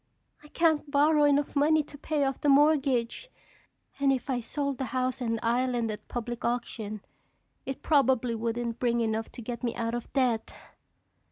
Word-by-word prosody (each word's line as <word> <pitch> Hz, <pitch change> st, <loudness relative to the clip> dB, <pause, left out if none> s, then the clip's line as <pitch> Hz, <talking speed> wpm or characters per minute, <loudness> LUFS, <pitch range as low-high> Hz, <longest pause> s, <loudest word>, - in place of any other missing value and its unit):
I 300 Hz, -, -15 dB
can't 315 Hz, -2 st, +1 dB
borrow 295 Hz, +1 st, +4 dB
enough 290 Hz, 0 st, +2 dB
money 305 Hz, +2 st, +4 dB
to 290 Hz, -, -14 dB
pay 295 Hz, 0 st, -1 dB
off 270 Hz, -1 st, -2 dB
the 290 Hz, -, +2 dB
mortgage. 280 Hz, -, +2 dB, 0.7 s
And 275 Hz, -1 st, +3 dB
if 265 Hz, 0 st, -1 dB
I 250 Hz, -, 0 dB
sold 280 Hz, +2 st, -3 dB
the 265 Hz, -, -1 dB
house 255 Hz, +1 st, -2 dB
and 230 Hz, -2 st, -1 dB
island 240 Hz, -1 st, 0 dB
at 210 Hz, -, -8 dB
public 240 Hz, 0 st, -5 dB
auction 220 Hz, -3 st, -3 dB, 0.7 s
it 270 Hz, -, -5 dB
probably 265 Hz, -5 st, +3 dB
wouldn't 230 Hz, +1 st, -3 dB
bring 235 Hz, -1 st, +1 dB
enough 220 Hz, 0 st, -2 dB
to 240 Hz, -, -9 dB
get 235 Hz, +1 st, -5 dB
me 235 Hz, -, -1 dB
out 230 Hz, 0 st, -2 dB
of 240 Hz, -1 st, -5 dB
debt." 245 Hz, -5 st, 0 dB
255 Hz, 170 wpm, -28 LUFS, 235-285 Hz, 0.7 s, borrow